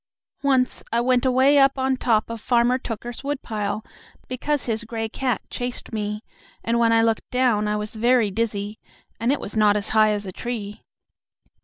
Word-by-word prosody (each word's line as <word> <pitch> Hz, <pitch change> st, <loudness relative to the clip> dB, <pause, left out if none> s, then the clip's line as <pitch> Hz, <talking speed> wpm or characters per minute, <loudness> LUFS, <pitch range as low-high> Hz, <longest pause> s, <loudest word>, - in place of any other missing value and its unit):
Once 265 Hz, -3 st, +1 dB
I 230 Hz, -, +2 dB
went 250 Hz, +1 st, +2 dB
away 265 Hz, +3 st, +5 dB
up 270 Hz, 0 st, +4 dB
on 265 Hz, 0 st, +1 dB
top 230 Hz, -3 st, +1 dB
of 230 Hz, -2 st, -6 dB
Farmer 245 Hz, +2 st, +2 dB
Tooker's 240 Hz, +1 st, -6 dB
woodpile, 215 Hz, -7 st, -3 dB, 0.4 s
because 285 Hz, +3 st, -2 dB
his 225 Hz, -1 st, -2 dB
gray 225 Hz, 0 st, -3 dB
cat 250 Hz, +2 st, -2 dB
chased 245 Hz, -1 st, -5 dB
me, 210 Hz, 0 st, -3 dB, 0.4 s
and 235 Hz, +1 st, +1 dB
when 230 Hz, -1 st, +4 dB
I 225 Hz, 0 st, +4 dB
looked 225 Hz, -1 st, 0 dB
down 245 Hz, -5 st, +2 dB
I 210 Hz, -, 0 dB
was 210 Hz, +2 st, -4 dB
very 235 Hz, -1 st, +3 dB
dizzy, 210 Hz, -1 st, -2 dB, 0.4 s
and 230 Hz, +4 st, +1 dB
it 285 Hz, -, 0 dB
was 205 Hz, -, -6 dB
not 210 Hz, -1 st, +4 dB
as 205 Hz, -, -2 dB
high 215 Hz, -1 st, +4 dB
as 205 Hz, -1 st, -2 dB
a 190 Hz, -, -5 dB
tree." 210 Hz, -1 st, -5 dB
230 Hz, 180 wpm, -23 LUFS, 215-255 Hz, 0.4 s, away